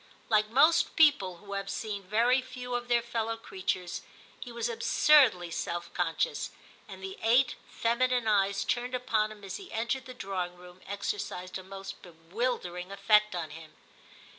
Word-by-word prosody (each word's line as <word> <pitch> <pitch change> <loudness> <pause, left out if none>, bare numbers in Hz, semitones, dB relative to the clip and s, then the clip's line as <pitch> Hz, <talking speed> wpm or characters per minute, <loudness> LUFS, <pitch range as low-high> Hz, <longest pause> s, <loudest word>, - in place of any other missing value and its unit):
Like 215 -1 +3
most 305 +8 +4
people 245 - +4
who 200 +2 -9
have 195 0 -3
seen 210 -3 -3
very 230 +7 +3
few 250 -1 -7
of 245 0 -2
their 240 -1 +2
fellow 230 -1 -2
creatures, 185 -4 -3 0.4
he 245 - -8
was 235 0 -2
absurdly 230 - +4
self 170 +1 -4
conscious, 175 - -1 0.4
and 190 -2 -10
the 190 0 -6
eight 245 +3 +4 0.2
femi 240 +2 +1
nine 250 -2 +1
eyes 200 -1 +2
turned 245 +1 -1
upon 220 -4 0
him 210 -1 -12
as 195 - -5
he 390 -2 -11
entered 235 +4 -2
the 255 - -9
drawing 185 -5 -3
room 180 +1 -14
exercised 195 - -4
a - - -10
most 195 +1 -8
bewilder 180 +4 -3
ing 180 +2 -8
effect 210 0 +3
on 160 -3 -4
him. 160 0 -11
215 Hz, 165 wpm, -30 LUFS, 185-245 Hz, 0.4 s, most